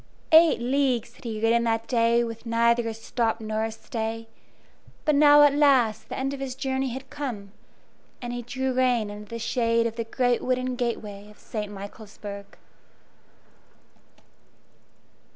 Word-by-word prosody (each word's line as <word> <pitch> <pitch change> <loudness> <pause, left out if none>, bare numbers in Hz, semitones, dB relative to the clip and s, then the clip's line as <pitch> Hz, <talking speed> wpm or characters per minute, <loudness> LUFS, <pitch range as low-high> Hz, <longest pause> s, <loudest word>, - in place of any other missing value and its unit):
Eight 320 -2 +7
leagues 245 -2 0
had 250 - -18
he 220 -2 -4
ridden 230 +1 +3
that 225 0 0
day 235 -1 +3
with 230 0 -7
neither 235 0 +2
a 225 - -2
stop 225 0 -1
nor 215 0 -2
a 225 - -4
stay; 225 0 -5 0.8
but 305 - +3
now 295 0 +7
at 290 -1 +6
last 250 -7 +3
the - - -5
end 270 +1 -2
of 280 - -6
his 265 -2 -4
journey 265 -1 -1
had 260 +2 -8
come, 230 -9 -5 0.7
and 240 -1 -5
he 245 - -4
drew 260 +2 -2
rein 250 -4 +1
under 210 0 -10
the 230 - -5
shade 230 0 +1
of 230 0 -3
the 230 - -1
great 245 +1 0
wooden 255 0 -1
gateway 210 -4 -4
of 210 - -17
St. 210 -2 -5
Michaelsburg. 200 0 -9
235 Hz, 155 wpm, -25 LUFS, 225-260 Hz, 0.8 s, Eight